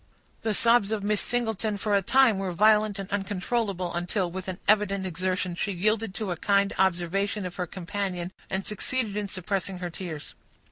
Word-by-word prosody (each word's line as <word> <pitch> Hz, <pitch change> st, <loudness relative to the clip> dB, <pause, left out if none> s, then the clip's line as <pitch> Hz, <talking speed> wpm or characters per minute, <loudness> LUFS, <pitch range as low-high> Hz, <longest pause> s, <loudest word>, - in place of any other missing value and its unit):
The 220 Hz, -2 st, 0 dB
sobs 230 Hz, -2 st, +4 dB
of 215 Hz, -2 st, -1 dB
Miss 210 Hz, 0 st, +1 dB
Singleton 225 Hz, -3 st, -1 dB
for 205 Hz, +1 st, -1 dB
a 200 Hz, -, +4 dB
time 245 Hz, -1 st, +4 dB
were 195 Hz, -1 st, -2 dB
violent 210 Hz, +2 st, +4 dB
and 195 Hz, -1 st, -5 dB
uncontrollable, 200 Hz, -1 st, -1 dB
until, 175 Hz, +1 st, -1 dB
with 185 Hz, +1 st, -5 dB
an 185 Hz, -1 st, -3 dB
evident 200 Hz, -2 st, +3 dB
exertion, 185 Hz, +1 st, -1 dB
she 200 Hz, +4 st, -2 dB
yielded 215 Hz, +2 st, 0 dB
to 210 Hz, -4 st, -3 dB
a 175 Hz, -, -2 dB
kind 200 Hz, +2 st, +2 dB
observation 190 Hz, +2 st, +1 dB
of 180 Hz, -, -6 dB
her 180 Hz, -2 st, -2 dB
companion, 185 Hz, 0 st, -3 dB, 0.2 s
and 190 Hz, 0 st, -2 dB
succeeded 215 Hz, +1 st, -1 dB
in 210 Hz, -1 st, -1 dB
suppressing 190 Hz, 0 st, -3 dB
her 180 Hz, -1 st, -4 dB
tears. 160 Hz, -4 st, -7 dB
195 Hz, 180 wpm, -27 LUFS, 185-210 Hz, 0.2 s, sobs